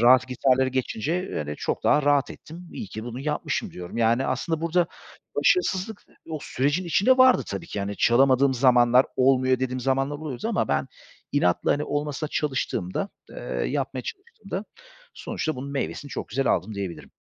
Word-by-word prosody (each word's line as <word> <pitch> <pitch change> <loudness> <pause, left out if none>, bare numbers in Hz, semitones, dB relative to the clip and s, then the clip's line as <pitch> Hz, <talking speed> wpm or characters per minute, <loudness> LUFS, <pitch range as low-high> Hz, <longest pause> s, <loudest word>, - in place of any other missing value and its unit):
rahat 125 +2 +6
gitarları 130 +1 +2
geçince, 130 - -2
hani, 75 -1 -4
çok - - -3
daha 150 - +4
rahat 145 0 +2
ettim, 170 +2 -11
iyi 225 - -6
ki 110 -9 -7
bunu 120 +2 -6
yapmışım, 150 +1 -2
diyorum. 90 +4 -8
Yani, 115 +3 +2
aslında 155 +5 -1
burada 170 +1 +2 0.5
başarısızlık 215 - +1 0.3
o 155 - -3
sürecin 145 +8 0
içinde 210 +10 +3
vardı 255 -1 +6
tabii 170 - -5
ki, 105 - -4
hani, 100 +1 -3
çalamadığım 130 +2 +4
zamanlar 125 0 +5
olmuyor 130 -1 +3
dediğim 130 0 -2
zamanlar 135 +3 0
oluyordu 155 - -5
ama 230 - 0
ben 70 -1 0 0.4
inatla, 90 0 +2
hani, 145 - -1
olmasına 145 +1 -2
çalıştığımda, 135 - -2 0.2
eee, - - -12 0.3
yapmaya 135 -2 -2
çalıştığımda, 215 - -7 0.5
sonuçta 155 -4 -3
bunun 140 +2 -6
meyvesini 140 +1 -3
çok - - -5
güzel 135 +3 -1
aldım, 100 +5 +1
diyebilirim. 95 -4 -6
135 Hz, 160 wpm, -25 LUFS, 125-155 Hz, 0.5 s, rahat